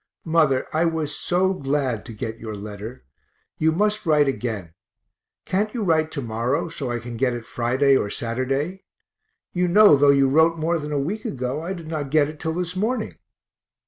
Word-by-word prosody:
Mother, 155 Hz, -5 st, +2 dB
I 160 Hz, +2 st, +2 dB
was 160 Hz, -3 st, -1 dB
so 185 Hz, +4 st, +1 dB
glad 135 Hz, -, -2 dB
to -, -, -7 dB
get 110 Hz, +1 st, -5 dB
your 110 Hz, -2 st, -6 dB
letter; 105 Hz, -, -8 dB, 0.5 s
you 160 Hz, +1 st, +3 dB
must 210 Hz, +5 st, 0 dB
write 150 Hz, -4 st, +3 dB
again 110 Hz, -10 st, -3 dB, 0.7 s
can't 210 Hz, +3 st, 0 dB
you 230 Hz, -, -1 dB
write 160 Hz, -4 st, +2 dB
to 140 Hz, -, -3 dB
morrow, 120 Hz, +8 st, -1 dB
so 135 Hz, -5 st, -5 dB
I 120 Hz, -, -1 dB
can 120 Hz, 0 st, -7 dB
get 125 Hz, 0 st, +1 dB
it 120 Hz, -2 st, -7 dB
Friday 130 Hz, +3 st, +2 dB
or 105 Hz, -, +1 dB
Saturday? 135 Hz, -, -2 dB, 0.7 s
you 180 Hz, 0 st, +1 dB
know 205 Hz, -2 st, +7 dB
though 145 Hz, 0 st, +4 dB
you 140 Hz, -1 st, +5 dB
wrote 160 Hz, +4 st, +4 dB
more 165 Hz, +1 st, 0 dB
than 150 Hz, 0 st, -6 dB
a 145 Hz, -, 0 dB
week 180 Hz, +11 st, -2 dB
ago 130 Hz, +3 st, -3 dB
I 175 Hz, +4 st, -3 dB
did 170 Hz, -3 st, -8 dB
not 155 Hz, -3 st, -3 dB
get 150 Hz, 0 st, +3 dB
it 150 Hz, 0 st, -9 dB
till 160 Hz, 0 st, -2 dB
this 180 Hz, 0 st, -3 dB
morning. 220 Hz, +4 st, -1 dB
145 Hz, 190 wpm, -23 LUFS, 125-170 Hz, 0.7 s, know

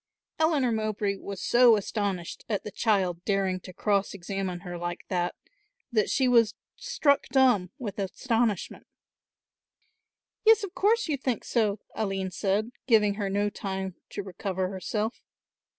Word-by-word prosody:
Eleanor 305 Hz, -6 st, +3 dB
Mowbray 215 Hz, -2 st, -1 dB
was 200 Hz, -1 st, -7 dB
so 240 Hz, -1 st, +6 dB
astonished 200 Hz, -4 st, -3 dB
at 205 Hz, -3 st, -1 dB
the 210 Hz, -, -6 dB
child 185 Hz, -6 st, +1 dB
daring 195 Hz, -2 st, 0 dB
to 185 Hz, -, -11 dB
cross 200 Hz, +2 st, 0 dB
examine 190 Hz, -1 st, -4 dB
her 175 Hz, -2 st, -6 dB
like 175 Hz, 0 st, -5 dB
that, 175 Hz, -2 st, -1 dB, 0.6 s
that 215 Hz, -3 st, +2 dB
she 265 Hz, -, +2 dB
was 230 Hz, -3 st, +4 dB, 0.2 s
struck 480 Hz, -, +1 dB
dumb 250 Hz, -9 st, +3 dB
with 210 Hz, -6 st, -5 dB
astonishment. 225 Hz, +1 st, -1 dB, 1.6 s
"Yes, 445 Hz, -1 st, +6 dB
of 390 Hz, -2 st, -5 dB
course 445 Hz, +4 st, +2 dB
you 295 Hz, -3 st, 0 dB
think 255 Hz, -3 st, -2 dB
so," 215 Hz, -3 st, 0 dB
Aline 195 Hz, -3 st, -2 dB
said, 205 Hz, +5 st, 0 dB, 0.2 s
giving 210 Hz, -4 st, +5 dB
her 200 Hz, -1 st, -2 dB
no 205 Hz, +1 st, 0 dB
time 190 Hz, -2 st, -4 dB, 0.2 s
to 200 Hz, -, -5 dB
recover 190 Hz, 0 st, -3 dB
herself. 210 Hz, +4 st, -3 dB
205 Hz, 140 wpm, -28 LUFS, 190-235 Hz, 1.6 s, so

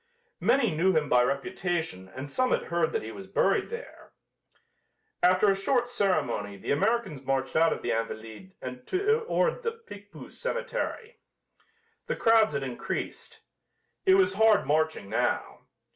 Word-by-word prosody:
Many 235 Hz, -, +2 dB
knew 185 Hz, +4 st, +3 dB
him 150 Hz, -2 st, 0 dB
by 125 Hz, -, +5 dB
reputation 140 Hz, -, -2 dB
and 130 Hz, +2 st, -5 dB
some 255 Hz, -, 0 dB
had -, -, +1 dB
heard 170 Hz, -2 st, 0 dB
that -, -, -2 dB
he 110 Hz, -, -6 dB
was 195 Hz, +8 st, -9 dB
buried 195 Hz, -, +1 dB
there. 470 Hz, +2 st, -9 dB, 1.1 s
After 185 Hz, +3 st, +5 dB
a -, -, +1 dB
short 240 Hz, +5 st, +1 dB
ceremony 150 Hz, -, 0 dB
the -, -, -4 dB
Americans 190 Hz, -, 0 dB
marched 135 Hz, 0 st, -1 dB
out 165 Hz, +1 st, +4 dB
of -, -, -3 dB
the -, -, -1 dB
"Invalides" 115 Hz, -, -5 dB
and 125 Hz, 0 st, -7 dB
toward 455 Hz, +5 st, +1 dB
the 460 Hz, -1 st, -2 dB
Picpus 205 Hz, -, -13 dB
cemetery. -, -, -4 dB, 0.9 s
The -, -, -1 dB
crowds 225 Hz, -8 st, +4 dB
had 140 Hz, -, -1 dB
increased. 125 Hz, -2 st, -5 dB, 0.7 s
It 380 Hz, -, +7 dB
was 380 Hz, -1 st, +3 dB
hard 220 Hz, -1 st, +4 dB
marching 155 Hz, -7 st, 0 dB
now. 110 Hz, -, -2 dB
185 Hz, 145 wpm, -28 LUFS, -, 1.1 s, It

